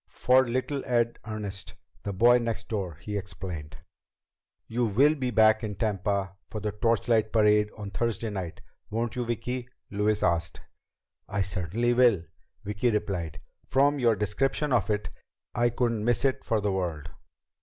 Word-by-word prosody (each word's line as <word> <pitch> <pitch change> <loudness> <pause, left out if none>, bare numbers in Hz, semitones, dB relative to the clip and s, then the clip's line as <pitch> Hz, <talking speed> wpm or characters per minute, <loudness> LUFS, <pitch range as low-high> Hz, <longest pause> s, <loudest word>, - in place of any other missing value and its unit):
"For 130 0 +3
little 130 +3 -1
Ed 120 -1 +1
Ernest, 105 -3 -5 0.3
the 100 - -3
boy 120 +6 +5
next 115 -1 -3
door," 95 -7 -3
he 105 - -5
explained. 85 -6 -7 0.9
"You 120 +1 0
will 135 +9 +4
be 130 -5 -2
back 110 -1 +4
in 105 -2 -3
Tampa 100 -2 -1
for 110 - -5
the 105 0 -2
torchlight 110 0 +1
parade 105 -1 +4
on 105 -2 -6
Thursday 115 +1 -1
night, 95 -4 -5 0.3
won't 115 +1 -2
you, 125 -1 -1
Vicki?" 120 +2 -3 0.2
Louise 105 +1 +1
asked. 85 -2 0 0.7
"I 100 -1 0
certainly 100 +6 0
will," 120 -8 +4 0.4
Vicki 105 +4 0
replied. 95 -8 -2 0.3
"From 140 +2 +3
your 115 -3 +4
description 135 +8 0
of 120 - +2
it, 105 -1 0 0.5
I 120 +1 +2
couldn't 115 -2 0
miss 120 +3 +2
it 135 - +1
for 110 -2 0
the 100 0 0
world." 85 -6 -3
110 Hz, 155 wpm, -28 LUFS, 100-120 Hz, 0.9 s, boy